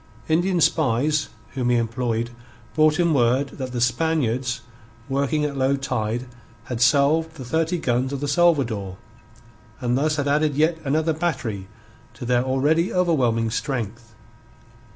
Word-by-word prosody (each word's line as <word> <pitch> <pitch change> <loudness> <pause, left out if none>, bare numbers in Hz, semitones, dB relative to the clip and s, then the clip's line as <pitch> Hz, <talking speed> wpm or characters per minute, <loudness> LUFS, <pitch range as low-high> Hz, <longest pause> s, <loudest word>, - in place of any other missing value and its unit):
Indian 175 +3 +2
spies 150 +1 +2 0.2
whom 125 -3 -2
he 120 - +3
employed 115 0 -1 0.4
brought 155 +1 +3
him 170 -2 +3
word 130 +1 +2
that 130 -1 -4
the 120 - -3
Spaniards, 125 -2 0 0.5
working 140 +2 0
at 145 -1 -3
low 135 +1 +2
tide, 120 -3 -2 0.4
had 120 0 -5
salved 155 +5 +3
the 130 -5 -8
thirty 165 +7 0
guns 130 -3 0
of 140 - -3
the 145 - -3
Salvador, 135 - +1 0.8
and 125 -2 0
thus 150 +3 +1
had 145 -2 -1
added 150 0 +2
yet 160 +3 +2
another 155 +3 +1
battery 135 - -3 0.5
to 125 - -7
their 120 0 +2
already 145 +7 +1
overwhelming 125 -11 +1
strength. 115 -3 -4
135 Hz, 140 wpm, -23 LUFS, 120-155 Hz, 0.8 s, he